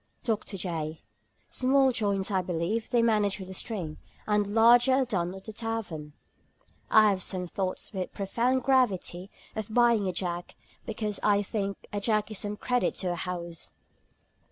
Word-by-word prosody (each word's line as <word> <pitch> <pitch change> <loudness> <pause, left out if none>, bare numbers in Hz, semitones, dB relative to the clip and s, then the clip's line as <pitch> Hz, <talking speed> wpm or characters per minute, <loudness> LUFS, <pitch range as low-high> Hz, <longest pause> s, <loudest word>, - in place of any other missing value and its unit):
DR. 225 - +2 0.2
J. 160 -4 -4 0.5
"Small 265 +1 +4
joints, 200 -4 0
I 190 -1 +2
believe, 180 +6 -2
they 240 -2 +3
manage 210 -3 +2
with 190 -1 -7
a - - -6
string, 185 -7 -3 0.3
and 210 0 +1
larger 240 +3 +6
are 265 0 +3
done 185 -6 -1
at 190 - -11
the 220 - -6
tavern. 205 -10 -4 0.8
I 215 -1 +7
have 190 -1 -2
some 180 0 -1
thoughts 185 +3 -3
(with 190 -2 -1
a - - -22
profound 240 +6 0
gravity) 200 -8 +1 0.3
of 220 -1 -4
buying 235 -3 +4
a - - +1
jack, 175 -1 -3 0.3
because 210 -1 -3
I 205 -1 +3
think 200 -1 -2 0.2
a 205 - 0
jack 215 0 +1
is 210 - -4
some 210 0 -3
credit 250 +2 0
to 180 -2 -1
a - - -3
house." 170 -1 -5
205 Hz, 170 wpm, -28 LUFS, 185-225 Hz, 0.8 s, I